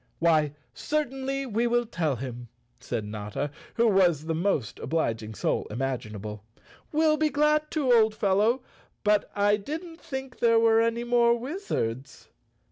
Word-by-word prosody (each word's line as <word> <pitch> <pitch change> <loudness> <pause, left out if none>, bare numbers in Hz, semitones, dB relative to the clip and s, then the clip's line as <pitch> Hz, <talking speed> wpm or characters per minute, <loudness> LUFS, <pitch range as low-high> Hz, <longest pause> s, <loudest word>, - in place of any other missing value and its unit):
"Why, 155 -3 +3 0.2
certainly 275 -2 -2
we 235 0 0
will 240 0 +2
tell 160 - -1
him," 120 -1 -7 0.3
said 115 -4 -4
Notta, 105 +7 -4 0.2
who 235 - +3
was 180 -7 +3
the 165 - -1
most 160 - -1
obliging 115 -9 -2
soul - - -1
imaginable. 105 -4 -4 0.5
"We'll 310 0 +3
be 310 0 +2
glad 300 +1 +2
to, 275 -6 +2
old 220 -2 +4
fellow, 215 +5 +2 0.4
but 210 0 +2
I 205 0 +3
didn't 325 - -7
think 265 -4 -6
there 230 -1 +4
were 225 0 +5
any 230 +1 0
more 240 -1 +3
wizards." 230 - -4
215 Hz, 140 wpm, -27 LUFS, -, 0.5 s, were